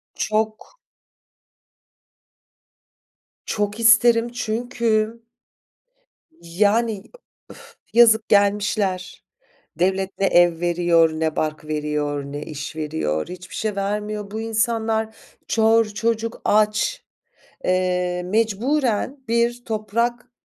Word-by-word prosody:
Çok. 215 - -2 2.7
Çok 210 0 -2
isterim 230 +1 +5
çünkü 230 -1 -1 1.2
Yani 205 +4 +1 0.5
uf - - -15 0.2
yazık. 225 -2 +5
Gelmişler. 200 -2 +1 0.5
Devlet 190 +2 0
ne 195 - +2
ev 175 -3 +4
veriyor, 170 -1 +3
ne 160 0 -2
bark 155 0 -2
veriyor, 150 -1 -2
ne 145 +1 -6
iş 150 0 -7
veriyor, 150 - -2
hiçbir 180 0 -10
şey 215 -2 -2
vermiyor. 210 +1 -3
Bu 220 +1 -4
insanlar... 220 0 -1 0.3
Çor, 225 0 +3
çocuk 225 +2 -2
aç. 215 - +1 0.6
Eee, 180 -1 0
mecburen 230 +5 0
bir 235 +1 0
toprak 235 +3 -2
210 Hz, 90 wpm, -22 LUFS, 180-225 Hz, 2.7 s, isterim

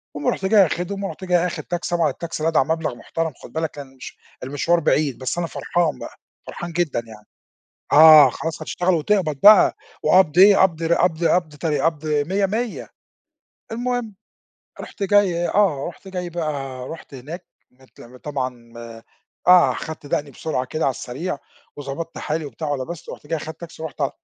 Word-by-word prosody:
المهم 145 - 0
رُحت 190 - -5
جاي 200 -1 +6
آخدهم 185 +4 -4
ورُحت 195 - -6
آخد 175 -1 +1
تاكسي 175 0 -3
طبعًا 165 -3 +2
التاكسي 160 +2 -6
لدعع 160 -4 +3
مبلَغ 160 -4 -2
محترَم 160 +5 -4
خُد 120 - -12
بالك 160 -1 -2
كان 135 -2 -11
مش - - -10 0.3
المشوار 145 +6 +1
بعيد 150 -4 +1
بس 130 +6 -3
أنا 170 -1 -1
فرحان 170 -2 -1
بقى، - - -9 0.3
فرحان 175 0 -6
جدًا 165 -8 -1
يعني 105 -1 -13 0.7
آه، 155 -2 +9
خلاص 165 +5 -5
هشتغل 180 0 0
وتقبَض 160 -2 0
بقى 210 0 +7 0.3
وقبْض 175 0 +4
إيه، 200 +1 +8
قبض 170 -3 +2
ر 165 +1 +2
قبض 170 -1 +1
قبض 165 -4 +1
تر 155 0 -1
قبض 160 -1 -1
مِيّة، 160 +7 +1
مِيّة، 225 +3 -3 0.8
المهم 240 -2 -3 0.7
رُحت 205 - -9
جاي، 190 -4 +2
آه 185 -10 +1
رُحت 190 +3 -12
جاي 180 -2 -5
بقى 140 -6 -4
رُحت 160 -3 -10
هناك 155 +8 -8 0.3
مت 130 +1 -22
م 125 +2 -13
طبعًا 130 -4 -5 0.8
آه، 180 -1 +7
خدت 160 -2 -7
دقني 145 0 -2
بسرعة 130 -1 -3
كده 155 +5 -3
على 135 - +3
السريع 140 +6 -5 0.4
وضبطت 145 +4 -6
حالي 155 +1 -3
وبتاع 150 +2 -6
ولِبست 145 +4 -5
رُحت - - -11
جاي 165 - -1
أخدت 160 +1 -8
تاكسي 170 -1 -10
ورُحت 155 -2 -7
ع 140 - +1
160 Hz, 170 wpm, -21 LUFS, 145-175 Hz, 0.8 s, آه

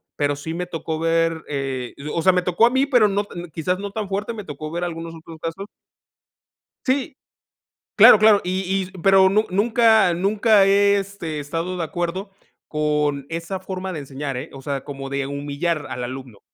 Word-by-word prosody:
pero 145 0 0
sí 155 +3 -6
me 180 +2 -3
tocó 160 -2 -4
ver, 165 0 +1
eh, 135 -3 -4
yo 150 +2 -6
o 165 - 0
sea, 185 - +5
me 180 0 +1
tocó 180 +5 +3
a - - +5
mí, 265 +2 +2
pero 245 -6 +4
no 205 +1 -1
no 175 0 -6
quizás 180 +4 -2
no 200 0 -5
tan 210 0 -4
fuerte 205 +4 -2
me 215 -2 -7
tocó 155 -2 -7
ver 170 +1 -3
algunos 165 -1 -5
otros 165 0 -12
casos. 165 +5 -5 1.2
Sí, 265 +1 0 0.8
claro 215 - +9
claro, 215 -1 +6
y 185 +1 -1
y - - -11
pero 190 0 +6
nu 210 +3 +2
nunca 220 0 +4
nunca, 200 +3 +3
he, 200 +1 +4
este, 195 -6 -4
estado 165 +5 -4
de 175 - -2
acuerdo 175 +3 -4 0.4
con 150 -2 0
esa 170 +3 -4
forma 190 0 -5
de 160 - -4
enseñar, 140 0 -5
¿eh?, 130 +6 -6
o 135 - -10
sea, 140 -1 -3
como 135 -1 -7
de 140 0 -2
humillar 145 +3 -2
al 125 - -4
alumno. 125 -3 -7
170 Hz, 190 wpm, -22 LUFS, 150-195 Hz, 1.2 s, claro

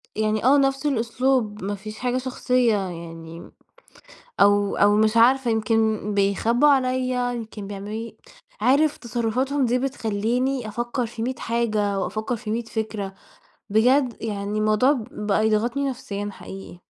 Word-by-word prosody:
يعني 215 0 0
آه، 275 +3 +6
نفس 270 0 +1
الأسلوب، 240 -4 0
ما 205 +1 -2
فيش 215 +2 -9
حاجة 250 0 0
شخصية 250 -2 +1
يعني 170 -3 -7 0.9
أو 205 0 +4
أو 205 0 +4
مش 215 +1 +3
عارفة، 250 +1 +4
يمكن 220 -1 +1
بيخبوا 210 +7 +2
عليّا، 255 -2 +1
يمكن 220 -3 -7
بيعمَّلوا 200 0 -7
لي 225 +1 -6 0.4
عارِف 285 +6 +3
تصرُّفاتهم 250 +4 -1
دي 245 +1 +1
بتخلِّيني 245 0 -1
أفكر 240 +3 -2
في 225 0 -7
مِية 255 +1 -2
حاجة، 215 -4 0
وأفكر 220 +5 -2
في 220 -1 -6
مِية 235 +2 -1
فكرة، 220 -3 -4 0.6
بجد 245 +4 +3
يعني 205 -1 -3
الموضوع 215 +6 +3 0.2
بقى 210 +1 0
يضغطني 240 +6 0
نفسيًا 205 -5 -5
حقيقي. 190 -2 -11
225 Hz, 135 wpm, -23 LUFS, 210-255 Hz, 0.9 s, آه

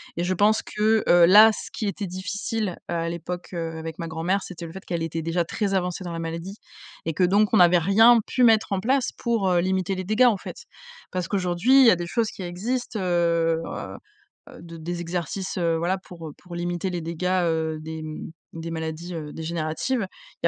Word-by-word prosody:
et 170 - -2
je 180 +1 0
pense 210 +4 +3
que, 215 +1 +1
heu, 175 -1 +7
là, 210 +5 +8
ce - - -7
qui 220 - -3
était 200 0 -3
difficile 200 +2 -3
à 165 -1 -2
l'époque, 175 +1 -6
heu, 165 -2 -4
avec 160 0 -7
ma 165 - -4
grand-mère, 165 +5 -1
c'était 175 -3 -8
le 165 - -8
fait 190 +2 -10
qu'elle 170 -2 -2
était 165 0 -3
déjà 165 +2 0
très 195 +4 -2
avancée 180 -1 -1
dans 175 - -5
la 165 - -4
maladie 165 +4 -5 0.5
et 165 - -1
que 180 +4 +2
donc 205 +3 +3
on - - +6
n'avait 175 0 +6
rien 220 +7 +6
pu 250 - 0
mettre 220 -3 +4
en 195 - +1
place 255 +5 +1
pour, 230 -5 0
heu, 180 -1 +3
limiter 185 +1 0
les 185 0 -5
dégâts 215 +6 +3
en 225 -4 +3
fait. - - -9 0.5
Parce 180 -2 -2
qu'aujourd'hui, 190 +7 +2
il - - +7
y 230 - +8
a 180 - +3
des 175 0 -4
choses 230 +4 0
qui - - -10
existent, 225 +8 -3
heu 170 -2 +1 0.9
heu, 255 - -13
d 170 -1 -10
des 170 +2 -4
exercices, 175 +3 -4
heu, 165 -2 +1
voilà, 175 +3 0
pour, 175 -3 -11
heu, 150 - -9
pour 180 -1 -13
limiter 175 +1 -2
les 175 -1 -3
dégâts, 165 +2 -5 0.2
heu, 160 -1 -1
des, 160 0 -7
mmh, 155 0 -7 0.2
des 165 0 -6
maladies, 160 +2 -5
heu, 150 -2 -6
dégénératives. 165 - -2 0.4
Il - - +5
175 Hz, 215 wpm, -24 LUFS, 165-200 Hz, 0.9 s, là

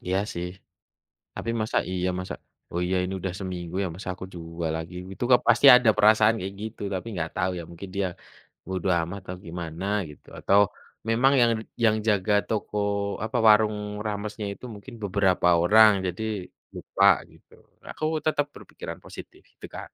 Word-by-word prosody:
Iya 95 +2 -1
sih, 85 +1 -4 0.9
tapi 115 - -4
masa 110 - -2
iya 90 0 -1
masa 90 0 -5 0.4
oh, 85 - -1
iya, 95 - 0
ini 95 +1 -3
udah 95 +1 -2
seminggu 90 -3 -6
ya 95 - 0
masa 95 - -8
aku - - -6
jual 85 -1 -4
lagi 80 +2 -6 0.2
itu 95 - -4 0.2
pasti - - +5
ada 125 -2 +6
perasaan 110 +1 +5
kayak 95 +2 -5
gitu 110 +1 -7
tapi 95 +3 -4
nggak 80 -3 -3
tahu 90 +1 +1
ya - - -5
mungkin 85 +3 -9
dia 100 - +1 0.6
bodo 95 0 -3
amat 90 +5 -5
atau 90 0 -6
gimana 85 +1 -6 0.3
gitu 75 - -17
atau 100 +1 +4 0.5
memang 120 +4 +4
yang 120 -1 +5 0.3
yang 110 -1 +4
jaga 105 -1 +2 0.2
toko 105 -1 -3 0.5
apa 110 +3 -3
warung 105 0 +5 0.3
ramesnya 105 0 -4
itu 100 - -12
mungkin 105 +5 -11
beberapa 95 -2 +2
orang 110 +4 +7
jadi 90 +4 -4 0.5
lupa - - +1 0.3
gitu. - - -21 0.4
Aku - - -5 0.2
tetap 145 -2 +2
berpikiran - - -9
positif - - -11
gitu, - - -11
Kak. - - -7
95 Hz, 165 wpm, -26 LUFS, 90-110 Hz, 0.9 s, orang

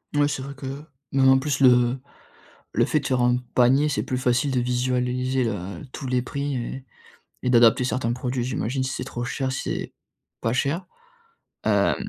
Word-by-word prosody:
Ouais 145 0 +4
c'est 140 -2 -3
vrai 140 +1 -6
que 135 +1 -6 0.3
même 135 -1 +4
en 130 - +7
plus, 140 0 -1
le 125 -1 +5 0.7
le - - +3
fait - - +1
de - - -6
faire 130 -1 +1
un 125 0 +3 0.2
panier, 130 +4 +4
c'est 145 - -1
plus 125 - -2
facile 125 +3 +1
de 125 - +1
visualiser, 125 +1 0
le 100 -6 -3
tous 135 - -6
les 125 -1 +1
prix 140 +2 -3
et 130 +1 -5 0.6
et 125 - 0
d'adapter 120 0 +6
certains 125 -2 -1
produits 125 0 -2
j'imagine, 130 +1 -2
si 130 - -2
c'est 125 - -4
trop 120 -2 -5
cher, 130 +2 -2
si 130 - -3
c'est - - -4 0.5
pas 115 - 0
cher. 145 +9 -1 0.8
Hem, - - +3
130 Hz, 190 wpm, -24 LUFS, 125-135 Hz, 0.8 s, en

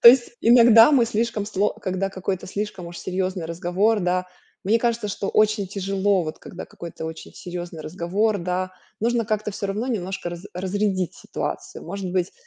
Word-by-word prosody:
То - - +11
есть 240 0 +6
иногда 235 +2 +8
мы 255 -4 +6
слишком, 225 -2 -1
сло 205 -1 +1
когда 185 +1 -2
какой-то 190 0 -3
слишком 195 -2 -4
уж 170 0 -8
серьёзный 185 -1 -2
разговор, 180 +6 +1
да, 180 0 0 0.4
мне 215 +4 +4
кажется, 230 -2 0
что 200 0 -3
очень 215 -1 +3
тяжело, 195 0 +1
вот 155 0 -5
когда 180 - -8
какой-то 170 -1 -8
очень 160 0 -7
серьёзный 175 -2 -6
разговор, 190 +7 0
да, 185 +1 -2 0.3
нужно 235 +1 +2
как-то 215 0 -1
всё 200 0 -3
равно 210 +5 -2
немножко 190 -6 -2
раз 175 +2 -8
разрядить 190 -1 -1
ситуацию. - - -5
Может 190 +1 -4
быть, 185 -1 0
195 Hz, 170 wpm, -24 LUFS, 180-215 Hz, 0.4 s, То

